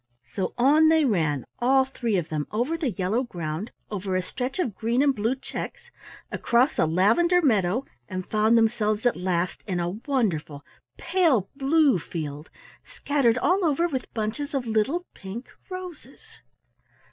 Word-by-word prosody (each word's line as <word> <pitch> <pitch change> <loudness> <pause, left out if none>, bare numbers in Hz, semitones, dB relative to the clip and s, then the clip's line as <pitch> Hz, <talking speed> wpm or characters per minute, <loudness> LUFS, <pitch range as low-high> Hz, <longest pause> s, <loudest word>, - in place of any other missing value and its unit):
So 190 - -3
on 295 +6 +5
they 320 -2 +4
ran, 155 - 0
all 265 +2 +4
three 235 -5 -1
of 170 -3 -2
them, 150 -2 -2
over 245 +9 -1
the 325 -5 -1
yellow 195 +4 0
ground, 175 -4 -4 0.2
over 190 -2 -2
a 185 - +2
stretch 250 +7 -4
of 285 - -1
green 235 +6 +1
and 280 -1 +3
blue 225 +2 0
checks, 480 - -7 0.4
across 245 +5 +2
a 160 - +4
lavender 225 - +3
meadow, 225 - +2 0.2
and 185 0 -4
found 220 +2 +3
themselves 220 -1 +1
at 245 - +3
last 180 -1 -1
in 180 -3 -1
a 175 0 -1 0.2
wonderful 165 - -1 0.3
pale 330 - +2
blue 280 - +3
field 150 -2 -6 0.3
scattered 270 -5 +1
all 365 +9 +2
over 335 +1 +2
with 265 -6 -4
bunches 230 +7 -3
of 265 -3 -1
little 235 +11 0
pink 200 +6 -8 0.2
roses. 370 -3 -10
235 Hz, 155 wpm, -25 LUFS, 185-280 Hz, 0.4 s, on